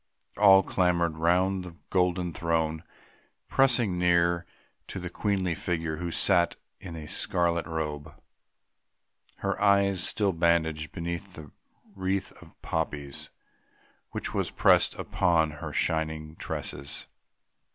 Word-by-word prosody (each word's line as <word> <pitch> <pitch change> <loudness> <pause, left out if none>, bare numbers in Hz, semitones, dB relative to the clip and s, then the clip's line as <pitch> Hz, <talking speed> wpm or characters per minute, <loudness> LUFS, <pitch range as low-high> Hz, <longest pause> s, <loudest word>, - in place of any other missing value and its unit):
All 95 -2 +7
had - - -18
clamoured 85 -3 +1
round 90 +3 +2
that 85 -2 -13
golden 90 -2 +1
throne, 80 -1 0 0.7
pressing 120 -9 +3
near 85 -1 +2 0.4
to - - -6
the 90 -1 -6
queenly 95 -3 0
figure 80 -2 -2
who 85 +1 -3
sat 85 0 +2 0.2
there 95 - -9
in 85 - -7
a 80 -2 -7
scarlet 85 +2 +1
robe, 75 -2 -4 1.2
her - - -2
eyes 100 -2 +3
still 100 -1 +1
bandaged 80 -2 +1
beneath 85 +2 -5
the 75 -2 -11 0.4
wreath 95 0 -2
of - - -16
poppies 75 -3 -3 0.8
which - - -5
was - - -1
pressed - - +4
upon 85 -4 +1
her 75 0 -7
shining 80 -1 -1
tresses. 70 -3 -5
85 Hz, 120 wpm, -28 LUFS, 80-95 Hz, 1.2 s, All